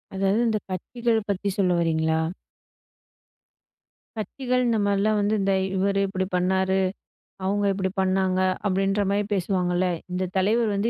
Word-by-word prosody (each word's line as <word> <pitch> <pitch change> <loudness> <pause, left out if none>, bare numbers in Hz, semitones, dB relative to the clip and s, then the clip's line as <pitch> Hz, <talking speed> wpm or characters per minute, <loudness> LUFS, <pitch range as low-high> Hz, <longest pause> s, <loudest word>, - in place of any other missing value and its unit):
அதாவது 195 +3 +1
இந்த 220 -1 +1
கட்சிகள் 225 +4 -1
பத்தி 200 +1 -1
சொல்ல 185 -3 +2
வர்றீங்களா? 160 -1 +1 2.0
கட்சிகள் 250 +3 -1
இந்த 230 - +2
மாதிரிலாம் 205 +1 +2
வந்து. 205 +2 +1
"இந்த 195 0 +2 0.2
இவரு 195 +1 +1
இப்படி 190 -1 -2
பண்ணாரு. 190 +1 +1 0.7
அவுங்க 205 +1 +1
இப்படி 190 -1 -1
பண்ணாங்க" 185 0 +1 0.3
அப்படின்ற 195 +1 +1
மாரி 205 +1 +1
பேசுவாங்கல்ல? 180 -1 0 0.2
"இந்த 180 +1 -1
தலைவர் 220 +4 +2
வந்து 205 +4 +1
195 Hz, 125 wpm, -25 LUFS, 185-205 Hz, 2.0 s, சொல்ல